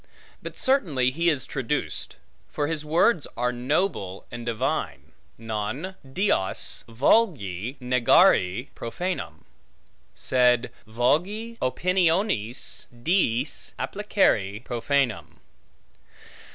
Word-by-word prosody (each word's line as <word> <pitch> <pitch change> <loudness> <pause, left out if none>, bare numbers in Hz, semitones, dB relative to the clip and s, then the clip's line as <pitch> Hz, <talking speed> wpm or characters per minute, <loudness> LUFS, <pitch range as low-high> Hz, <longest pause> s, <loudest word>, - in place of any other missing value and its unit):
But - - -8
certainly 160 - +2
he 170 +5 +1
is 145 -5 0
traduced; 135 +1 -3 0.3
for 145 - -2
his 155 0 -2
words 160 +3 +2
are 125 +1 +1
noble 125 - -1
and 120 0 -6
divine: 115 -2 -2 0.3
Non 115 - -4
deos 135 - -1
vulgi 120 - +1
negare 125 -3 +3
profanum; 115 - -5 0.7
sed 125 -2 +2 0.2
vulgi 180 - 0
opiniones 170 - 0
diis 125 0 0
applicare 115 - 0
profanum. 120 - -1
130 Hz, 85 wpm, -25 LUFS, 115-175 Hz, 0.7 s, negare